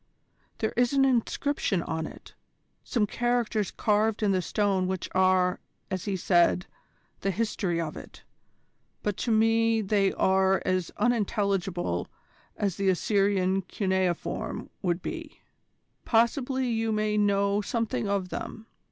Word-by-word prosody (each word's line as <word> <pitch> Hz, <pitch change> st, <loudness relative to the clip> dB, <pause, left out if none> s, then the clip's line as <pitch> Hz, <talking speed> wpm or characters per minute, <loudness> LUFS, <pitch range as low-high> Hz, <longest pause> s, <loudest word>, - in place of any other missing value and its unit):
There 220 Hz, -, -1 dB
is 245 Hz, +2 st, +2 dB
an 270 Hz, -1 st, +4 dB
inscription 250 Hz, -5 st, 0 dB
on 160 Hz, -1 st, -3 dB
it, -, -, -13 dB, 0.5 s
some 230 Hz, -4 st, +1 dB
characters 235 Hz, -2 st, 0 dB
carved 215 Hz, +1 st, +1 dB
in 205 Hz, -, +3 dB
the 185 Hz, -1 st, +2 dB
stone 195 Hz, 0 st, 0 dB
which 185 Hz, -1 st, -3 dB
are, 185 Hz, -1 st, +3 dB, 0.3 s
as 185 Hz, -2 st, -3 dB
he 200 Hz, -2 st, -1 dB
said, 175 Hz, 0 st, +3 dB, 0.5 s
the 195 Hz, -, -1 dB
history 195 Hz, -4 st, -1 dB
of 160 Hz, -2 st, -3 dB
it, -, -, -11 dB, 0.8 s
but 205 Hz, -2 st, -1 dB
to 235 Hz, -, -1 dB
me 225 Hz, +1 st, +3 dB
they 200 Hz, -2 st, +2 dB
are 190 Hz, 0 st, +3 dB
as 185 Hz, -2 st, 0 dB
unintelligible 200 Hz, -, 0 dB, 0.5 s
as 200 Hz, -4 st, -1 dB
the 195 Hz, -1 st, +2 dB
Assyrian 195 Hz, 0 st, +2 dB
cuneiform 190 Hz, -2 st, -2 dB
would 175 Hz, -2 st, -1 dB
be. 330 Hz, -3 st, -6 dB, 0.6 s
Possibly 255 Hz, +3 st, +1 dB
you 225 Hz, -1 st, 0 dB
may 215 Hz, 0 st, 0 dB
know 200 Hz, 0 st, +2 dB
something 225 Hz, 0 st, -2 dB
of 195 Hz, -2 st, -1 dB
them. 220 Hz, +4 st, -6 dB
200 Hz, 130 wpm, -27 LUFS, 185-225 Hz, 0.8 s, an